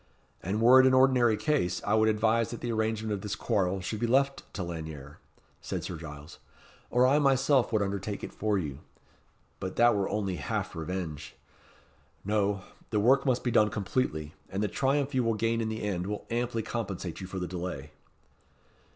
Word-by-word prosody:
"And 95 +5 -2
were 125 +3 +8
it 130 - +7
an 130 - +4
ordinary 130 -4 +4
case, 115 - 0
I 105 - +1
would 110 0 +4
advise 110 +1 +2
that 120 - -6
the 120 - -2
arrangement 110 -1 -1
of 100 - -3
this 105 -1 -3
quarrel 95 -1 0
should 105 +3 -4
be 120 - 0
left 135 +3 +1
to 95 - -2
Lanyere," 80 -4 -7 0.4
said - - -4
Sir 90 - -5
Giles; 75 -1 -10 0.5
"or 125 +1 +4
I 140 +3 +4
myself 135 -2 +3
would 110 -3 +2
undertake 100 +1 -4
it - - -6
for 105 -1 0
you. 75 -6 -4 0.8
But 95 0 -5
that 120 -1 +5
were 100 -1 0
only 100 -4 -2
half - - -3
revenge. 80 -3 -5 0.9
No; 100 -2 0 0.3
the 105 - +1
work 135 +6 +4
must 125 -2 +1
be 125 - 0
done 105 -1 +4
completely; 95 - -2 0.2
and 95 +3 -2
the - - +2
triumph 140 +4 0
you 130 -1 +2
will 115 -1 +1
gain 115 +1 0
in 110 - -1
the 110 0 -4
end 95 -3 -2
will 105 0 -4
amply 120 -1 -1
compensate 100 -7 -4
you 95 - -6
for 95 - -6
the 90 - -2
delay." 85 -5 -5
105 Hz, 190 wpm, -29 LUFS, 90-120 Hz, 0.9 s, were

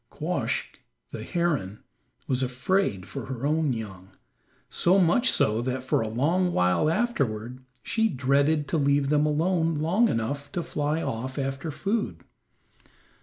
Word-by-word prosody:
Quoskh, - - -3 0.3
the - - -6
heron, 150 - -2 0.4
was 130 0 -1
afraid 125 - 0
for - - -6
her 130 0 -4
own 155 -1 +1
young, 95 -5 -6 0.6
so 180 +3 +3
much 190 +7 +4
so 110 +2 +3
that 130 +1 -3
for 130 - +1
a 110 - -2
long 165 +11 +1
while 90 +12 +2
afterward 130 - -1 0.2
she 225 0 +1
dreaded 140 +2 +1
to 165 - +1
leave 140 -1 +2
them 150 0 +3
alone 165 +2 +1
long 170 +10 +2
enough 140 - -3
to 175 - -2
fly 150 +2 -2
off 130 +4 -4
after 135 +2 -3
food. 200 +9 -2
145 Hz, 140 wpm, -26 LUFS, 125-170 Hz, 0.6 s, much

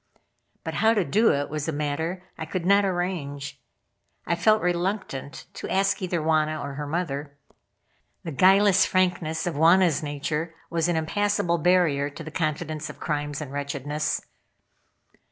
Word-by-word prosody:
But - - -4
how 225 +1 +3
to 200 -5 +2
do 220 +6 +3
it 145 0 0
was 150 0 -4
a - - 0
matter 160 +5 -2
I 160 - -5
could 175 +1 -3
not 200 +2 +5
arrange. 175 -7 -3 0.6
I - - 0
felt 215 +6 +3
reluctant 175 -5 -2
to - - -7
ask 195 +1 +1
either 180 -2 -1
Wauna 155 -1 +1
or 140 0 -5
her 145 +1 -5
mother. 145 -3 -3 0.9
The 165 - -5
guileless 190 +5 +5
frankness 175 -4 0
of 175 - -1
Wauna's 170 +2 +4
nature 150 +2 -3 0.2
was 165 0 +1
an 175 - +1
impassable 170 +1 0
barrier 160 -5 +3
to 155 +3 -9
the 155 - -8
confidence 155 -1 -2
of - - -10
crimes 145 -1 -3
and 145 -3 -6
wretchedness. 145 +1 -2
160 Hz, 155 wpm, -25 LUFS, 145-185 Hz, 0.9 s, not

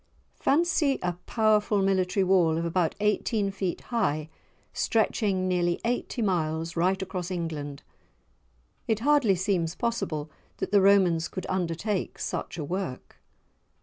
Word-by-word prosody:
Fancy 300 -2 +2
a 180 0 0
powerful 215 -2 +2
military 190 0 +2
wall 180 -4 +3
of 165 - -1
about 170 -1 0
eighteen 210 0 +1
feet 190 -2 -3
high 155 -9 0 0.4
stretching 205 -4 +1
nearly 175 -1 +1
eighty 240 0 -1
miles 165 -3 -1
right 185 +3 +2
across 180 -1 -4
England! 155 -5 -4 1.0
It 220 -2 0
hardly 280 -7 +4
seems 175 -3 0
possible 190 -11 -2 0.3
that - - -4
the 205 -1 +5
Romans 185 -4 +4
could 185 - -6
undertake 185 +2 -2
such - - -4
a 155 - -3
work. 175 -4 -5
185 Hz, 125 wpm, -27 LUFS, 170-210 Hz, 1.0 s, the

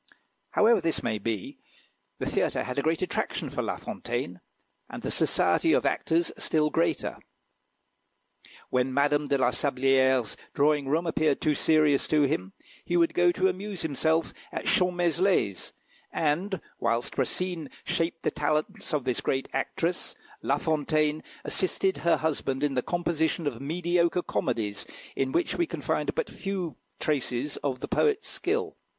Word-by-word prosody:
However 220 -1 +5
this 165 -1 0
may 110 -2 -1
be, 105 -2 -4 0.6
the - - -3
theatre - - 0
had 125 +2 -2
a - - +2
great 160 +4 0
attraction - - -2
for - - -2
La - - -2
Fontaine, - - -4 0.5
and - - -8
the - - -1
society 330 - +3
of - - +2
actors 165 +1 +1
a - - -11
still 150 -1 +2
greater. 165 - 0 1.5
When 130 +1 +1
Madame 145 +1 +2
de 140 0 +2
la 130 -2 +3
Sablière's 130 -2 +2 0.2
drawing 145 -1 +3
room 160 +5 +1
appeared 155 -3 +1
too 150 - +2
serious 150 -2 +3
to 150 -1 +3
him, 95 -9 -1 0.3
he 175 - 0
would 170 -1 +3
go 175 0 +4
to 185 +2 +2
amuse 190 0 -3
himself 160 +2 +1 0.2
at - - -4
Champmeslé's, 175 - +2 0.4
and, 175 +5 0 0.2
whilst 115 +1 -1
Racine 175 -5 0
shaped 165 0 -1
the - - +1
talents 155 +4 -1
of 145 - -1
this 125 -2 -1
great 135 0 -1
actress, 165 +6 -1 0.3
La 140 - +1
Fontaine 155 0 +1 0.2
assisted 190 +1 +1
her 170 -1 +3
husband 140 -3 -1
in 145 -2 +1
the 125 - +1
composition 170 0 0
of 135 -5 -3
mediocre 170 +3 +1
comedies, 105 -3 -2 0.3
in 135 -1 0
which 170 +5 0
we 345 - +2
can - - -6
find - - 0
but 485 - 0
few 185 -7 -4 0.2
traces 140 -1 -1
of 135 -3 -3
the - - -3
poet's 440 -1 +1
skill. - - -1
155 Hz, 155 wpm, -28 LUFS, 135-175 Hz, 1.5 s, However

